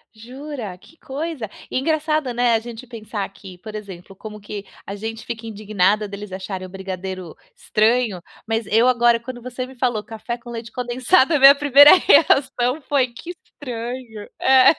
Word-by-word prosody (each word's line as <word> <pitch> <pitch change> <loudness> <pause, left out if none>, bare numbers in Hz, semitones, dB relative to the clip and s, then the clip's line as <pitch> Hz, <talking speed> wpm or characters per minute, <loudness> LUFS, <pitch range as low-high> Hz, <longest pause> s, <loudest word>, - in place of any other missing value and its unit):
Jura, 245 -4 -8
que 325 - -20
coisa 280 -6 -5 0.2
e - - -1
engraçado, 305 -2 0
né, 245 -1 +3
a 225 - +3
gente 235 +2 -9
pensar 215 -4 -5
que, 195 -2 -13
por 215 +4 -10
exemplo, 195 -3 -9
como 210 +2 -9
que 205 0 -7 0.2
a 200 - -6
gente 225 +2 -6
fica 230 -1 -6
indignada 210 -1 0
deles 200 0 -8
acharem 190 0 -6
o - - -15
brigadeiro 190 -2 -6 0.2
estranho, 225 - +1 0.3
mas 225 -1 -1
eu 225 +3 +4
agora 240 -2 +4
quando 245 +1 -8
você 255 +1 -5
me 260 - -13
falou: 240 -4 -1
"Café 235 +1 -6
com 240 0 -11
leite 230 -1 -7
condensado", 255 +6 +2
a 295 - +3
minha 275 +1 +9
primeira 285 +1 +8
reação 275 -5 +3
foi: 275 -3 +2
"Que 250 +9 -9
estranho". 235 -4 -7
É. 265 +1 +6
235 Hz, 170 wpm, -21 LUFS, 210-255 Hz, 0.3 s, minha